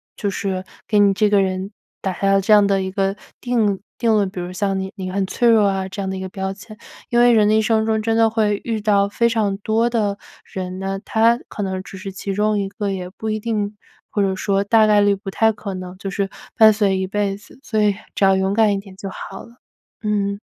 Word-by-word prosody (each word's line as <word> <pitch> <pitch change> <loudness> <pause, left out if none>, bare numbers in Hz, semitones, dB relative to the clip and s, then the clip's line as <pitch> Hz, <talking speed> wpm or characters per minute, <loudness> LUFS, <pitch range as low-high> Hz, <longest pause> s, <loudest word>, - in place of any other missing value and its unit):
就 205 - -2
是 190 -1 -3 0.2
给 210 - +2
你 200 -1 +5
这 210 +2 +2
个 205 -1 +4
人 190 +1 -2 0.3
打 190 - -2
下 195 +2 +1
了 195 - +4
这 205 +3 +3
样 205 -1 +6
的 195 -1 +2
一 190 - -4
个 195 0 0 0.3
定 220 -6 0 0.2
定 230 -2 +2
了 205 -2 +2
比 185 -1 -7
如 180 +1 -5
像 195 0 -1
你 190 0 -4
你 190 -2 -5
很 195 +1 -1
脆 235 +5 +1
弱 220 -3 +5
啊 190 -1 -1
这 195 +1 -5
样 - - -3
的 190 - -3
一 - - -5
个 190 0 -5
标 190 0 -4
签。 215 +2 -13 0.3
因 240 -2 +2
为 240 0 +6
人 215 -2 +4
的 215 - +3
一 220 - +4
生 220 0 +2
中 220 0 +1
真 225 0 +1
的 225 0 +4
会 215 -2 0
遇 225 -2 -2
到 200 -1 +2
非 235 +3 +2
常 215 -4 0
多 220 +3 +1
的 210 -4 -1 0.3
人 185 -1 -6
呢， 195 0 -3
他 230 +2 +3
可 205 - -4
能 190 -1 -3
只 190 - -10
是 195 +1 -7
其 195 +1 -5
中 210 0 +1
一 195 -1 -2
个， 205 0 -3
也 180 -2 -4
不 220 +4 -6
一 215 - -1
定， 210 -2 -2 0.4
或 205 - 0
者 195 -1 +1
说 195 +1 0
大 220 +2 +4
概 210 -1 +5
率 205 0 +3
不 195 0 -7
太 220 +3 +3
可 205 -2 -6
能 185 0 -7
就 195 +1 -5
是 195 0 -1 0.3
伴 220 -2 +7
随 205 -2 +1
一 190 - -2
辈 200 0 -1
子， 210 +5 -18
所 215 -2 0
以 205 -1 +3 0.2
只 - - 0
要 195 0 +5
勇 190 +1 0
敢 220 0 +4
一 - - 0
点 195 -1 -13
就 195 0 -6
好 195 0 -8
了。 235 +1 -17 0.5
嗯。 200 -1 -1
200 Hz, 275 characters per minute, -20 LUFS, 195-215 Hz, 0.5 s, 伴